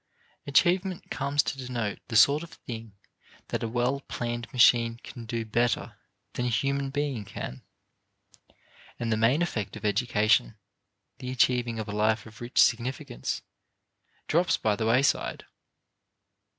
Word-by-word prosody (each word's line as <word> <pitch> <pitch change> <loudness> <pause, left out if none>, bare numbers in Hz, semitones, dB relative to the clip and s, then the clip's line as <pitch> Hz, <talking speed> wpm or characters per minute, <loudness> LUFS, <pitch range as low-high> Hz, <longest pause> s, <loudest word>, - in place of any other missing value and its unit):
Achievement 180 +5 +2
comes 140 0 +1
to 135 - -4
denote 120 -5 -3
the 115 - -5
sort 140 +7 +6
of 170 - -10
thing 115 -3 -8 0.6
that - - -2
a 115 - -1
well 125 +4 0
planned 120 -3 -5
machine 115 -2 +5
can 115 -2 -9
do 115 0 -2
better 120 0 0 0.4
than 125 - -1
a - - +1
human 135 +4 0
being 140 -5 -2
can, 65 -9 -7 1.4
and 115 -1 -2
the - - +3
main 120 +9 +3
effect 110 - -3
of 105 - -8
education, 110 0 +2 0.6
the 125 - -5
achieving 125 -2 +1
of 110 -1 -4
a - - -4
life 110 +1 +1
of 110 +2 -14
rich 120 +1 -1
significance, 120 - -2 0.8
drops 170 +3 +2
by 105 -1 +1
the 110 +1 -1
wayside. 130 +5 +1
120 Hz, 140 wpm, -28 LUFS, 110-135 Hz, 1.4 s, sort